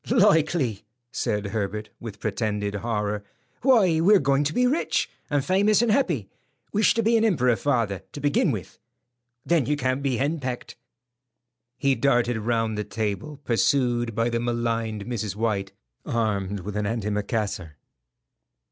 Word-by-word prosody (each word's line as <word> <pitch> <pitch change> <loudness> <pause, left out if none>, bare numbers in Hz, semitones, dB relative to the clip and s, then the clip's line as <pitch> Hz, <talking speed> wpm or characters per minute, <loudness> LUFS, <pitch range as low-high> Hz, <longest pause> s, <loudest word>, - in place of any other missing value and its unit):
"Likely," 155 - +3 0.3
said 105 0 -1
Herbert, 105 +1 -3
with 110 -3 -8
pretended 105 -1 -2
horror. 105 -1 -2 0.4
"Why, 210 -11 +4
we're 200 +5 +6
going 140 -2 +2
to 150 - 0
be 250 - +3
rich, 280 +7 +1 0.2
and 145 -2 0
famous 205 +4 +3
and 235 - +2
happy. 170 - +1 0.5
Wish 210 +1 +3
to 230 - +1
be 230 +2 +4
an 225 - +2
emperor, 125 - +3
father, 110 -8 0
to - - -6
begin 145 +4 +2
with; 105 - -5 0.7
then 165 -7 +2
you 150 +1 +1
can't 130 0 0
be 135 -3 0
henpecked." 135 -3 -3 1.0
He 140 -2 +2
darted 120 -4 +2
round 115 -1 0
the - - -1
table, 115 +8 -4
pursued 120 -2 +1
by 115 +1 +1
the 115 - 0
maligned 115 -3 -2
Mrs. 110 -5 -3
White 105 -3 -1 0.3
armed 100 -4 -1
with 100 +3 -6
an 105 -1 -1
antimacassar. 105 -5 -2
120 Hz, 145 wpm, -25 LUFS, 105-145 Hz, 1.0 s, we're